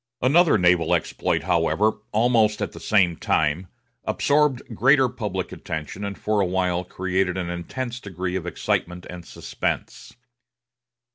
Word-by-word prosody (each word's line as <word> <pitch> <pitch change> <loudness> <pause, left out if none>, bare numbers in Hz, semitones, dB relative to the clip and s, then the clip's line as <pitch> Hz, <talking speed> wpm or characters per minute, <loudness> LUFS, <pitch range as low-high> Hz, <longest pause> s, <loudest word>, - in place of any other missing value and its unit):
Another 155 +2 +5
naval 90 -3 +3
exploit, - - -1
however, 100 +6 +1
almost 110 -1 +3
at - - -2
the - - -11
same 95 -6 +3
time, 80 +3 0 0.4
absorbed 145 -3 +2
greater 135 +4 +5
public 105 -7 -4
attention, 80 +5 -6
and 100 -1 -4
for 105 -1 0
a - - +2
while 90 -1 0
created 90 0 -1
an 90 -2 -3
intense 120 +8 -5
degree 90 -3 -4
of 90 -2 -3
excitement 90 0 -2
and 90 -1 -8
suspense. - - -4
95 Hz, 135 wpm, -24 LUFS, 90-115 Hz, 0.4 s, Another